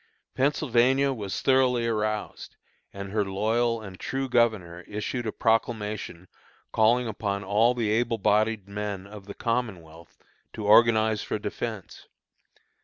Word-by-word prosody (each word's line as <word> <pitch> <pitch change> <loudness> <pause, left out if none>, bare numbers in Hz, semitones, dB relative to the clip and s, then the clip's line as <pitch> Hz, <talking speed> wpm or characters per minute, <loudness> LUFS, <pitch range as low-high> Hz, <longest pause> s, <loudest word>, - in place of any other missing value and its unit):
Pennsylvania 135 -1 +2
was 105 -6 -5
thoroughly 130 -3 +3
aroused, 110 -2 -3 0.4
and 100 0 -7
her 105 0 +1
loyal 110 +4 0
and 95 -3 -10
true 135 0 -3
governor 110 -9 +1
issued 110 +3 -4
a - - -1
proclamation 105 -6 -1 0.4
calling 120 +3 +3
upon 100 -2 -3
all 110 +5 +3
the 115 -3 0
able 115 +1 +1
bodied 105 0 +1
men 100 -1 -5
of 100 -1 -12
the 100 - -8
Commonwealth 90 -9 -4 0.4
to 110 - -6
organize 110 0 +5
for - - -3
defence. 105 -1 -6
110 Hz, 125 wpm, -26 LUFS, 100-120 Hz, 0.4 s, organize